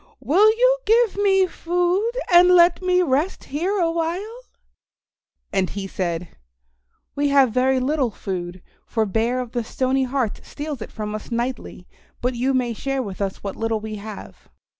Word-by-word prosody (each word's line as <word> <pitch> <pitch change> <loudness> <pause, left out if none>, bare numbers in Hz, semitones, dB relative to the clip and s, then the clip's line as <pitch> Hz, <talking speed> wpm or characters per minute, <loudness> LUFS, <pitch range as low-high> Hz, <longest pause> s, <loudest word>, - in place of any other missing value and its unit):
Will 340 - +4
you - - +3
give 455 0 +3
me 385 -2 +4
food 355 +5 0 0.2
and 350 +1 +8
let 350 -1 +5
me 365 0 +2
rest 300 +4 0
here 355 +9 -2
a 335 -3 +1
while?" 350 +8 -3 1.1
And 190 -2 +1
he 200 -1 -5
said, 175 -3 -3 0.8
"We 285 0 0
have 275 -4 +4
very 260 +2 +2
little 265 0 0
food, 180 -3 -6 0.2
for 225 -2 0
Bear 225 +5 0
of 250 -2 -5
the 240 -2 -2
Stony 260 +3 0
Heart 255 -4 -2
steals 290 -4 -6
it - - -7
from 210 -1 -5
us 215 - -6
nightly, 240 -6 -4 0.3
but 250 +1 -1
you 255 +3 0
may 245 -2 0
share 270 +3 -2
with 200 -3 -7
us 195 -1 -3
what 200 -1 -4
little 225 -1 -1
we 215 0 -6
have." 210 0 -10
260 Hz, 165 wpm, -22 LUFS, 220-350 Hz, 1.1 s, and